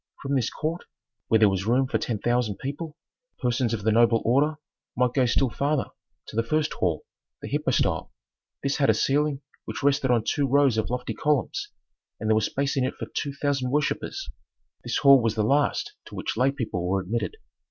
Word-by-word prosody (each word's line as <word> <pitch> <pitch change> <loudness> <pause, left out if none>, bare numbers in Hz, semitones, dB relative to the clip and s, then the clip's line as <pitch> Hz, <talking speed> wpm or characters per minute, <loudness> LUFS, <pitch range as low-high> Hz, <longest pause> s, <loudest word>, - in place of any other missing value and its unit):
From 140 0 -2
this 125 -4 +1
court, 165 +3 -4 0.4
where 110 - +4
there 110 -1 +6
was 95 0 -1
room 125 +3 +3
for 130 - -1
ten 115 - -2
thousand 120 -1 0
people, 150 +3 -6 0.4
persons 120 -2 0
of 110 -3 -3
the 110 - +3
noble 115 +1 +4
order 145 +6 +3 0.4
might 125 -1 +2
go 130 -3 +3
still 125 +1 +2
farther 145 +2 -1 0.3
to - - -11
the 115 - +3
first 155 +6 0
hall, 85 -4 -1 0.4
the - - -4
hypostyle; - - 0 0.5
this 140 0 0
had 140 - +3
a - - +5
ceiling 145 0 +1 0.2
which - - -6
rested 140 -1 +2
on 120 -3 +3
two 140 +4 0
rows 140 -2 +4
of 110 - -2
lofty 125 +1 -3
columns, 390 - 0 0.5
and 110 - -3
there - - +5
was 110 -1 +2
space 140 +1 -1
in 135 - +1
it 130 - -2
for - - -5
two 140 - -2
thousand 140 -2 -1
worshippers. 150 - -1 0.6
This - - -1
hall 140 -2 +7
was 115 -1 0
the 110 - +1
last 140 +6 +1
to - - -11
which - - -3
lay 130 +4 +3
people 115 -10 -3
were 95 +1 +2
admitted. 115 - -3
130 Hz, 200 wpm, -26 LUFS, 115-145 Hz, 0.6 s, hall